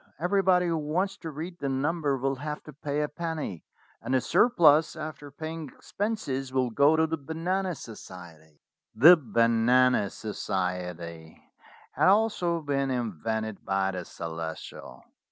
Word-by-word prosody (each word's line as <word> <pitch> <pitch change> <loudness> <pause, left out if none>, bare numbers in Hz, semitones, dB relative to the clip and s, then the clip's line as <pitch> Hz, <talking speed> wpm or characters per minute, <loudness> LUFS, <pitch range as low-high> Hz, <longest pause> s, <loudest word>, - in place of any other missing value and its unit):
Everybody 180 0 +3
who 165 -2 0
wants 175 +6 -1
to 165 - -7
read 165 +4 -7
the 140 - -2
number 145 +1 0
will 135 +1 -1
have 150 +2 -5
to 150 - -11
pay 145 +1 -3
a 150 - 0
penny, 155 - -5 0.4
and 130 - -1
the - - +4
surplus, 165 - +4
after 155 -2 -7
paying 155 +1 -6
ex - - -18
penses, 170 - -2
will 130 -2 0
go 145 +7 +4
to 160 0 +3
the 160 0 -3
Banana 175 +5 -2
Society." 85 - -12 0.3
The 155 +11 +9
Banana 115 - +3
Society 90 -6 -4 0.5
had - - +2
also 190 -5 +2
been 140 -2 -1
invented 110 -2 -3
by 95 0 0
the 90 -1 -5
Celestial. 80 -1 -7
140 Hz, 140 wpm, -27 LUFS, 110-165 Hz, 0.5 s, The